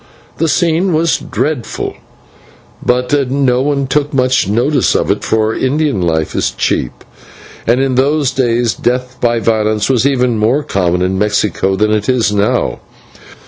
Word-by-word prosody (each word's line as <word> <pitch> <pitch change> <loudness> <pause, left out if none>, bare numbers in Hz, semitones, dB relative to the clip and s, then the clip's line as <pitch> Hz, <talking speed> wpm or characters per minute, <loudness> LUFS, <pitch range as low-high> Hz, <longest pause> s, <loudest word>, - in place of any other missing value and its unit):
The 165 - +2
scene 175 +3 +1
was 160 +1 +1
dreadful, 150 -6 -3 0.9
but 125 +2 0 0.2
no 130 -2 +1
one 140 0 0
took 145 +2 -1
much 130 -1 +2
notice 120 +8 +1
of - - +1
it, - - -2
for 110 0 0
Indian 140 -4 0
life 80 -2 -1
is - - 0
cheap, - - -2 0.6
and 120 +3 +3
in 135 -1 +1
those 140 +2 +1
days 120 -3 0
death 125 +1 -2
by 120 -1 +2
violence 110 0 0
was 130 +1 +2
even 125 -4 +1
more 120 +8 +1
common 90 -6 0
in 95 +1 -1
Mexico 105 -2 0
than 105 +2 +1
it 105 +1 0
is 125 -5 +2
now. 105 0 0
125 Hz, 150 wpm, -14 LUFS, 110-140 Hz, 0.9 s, and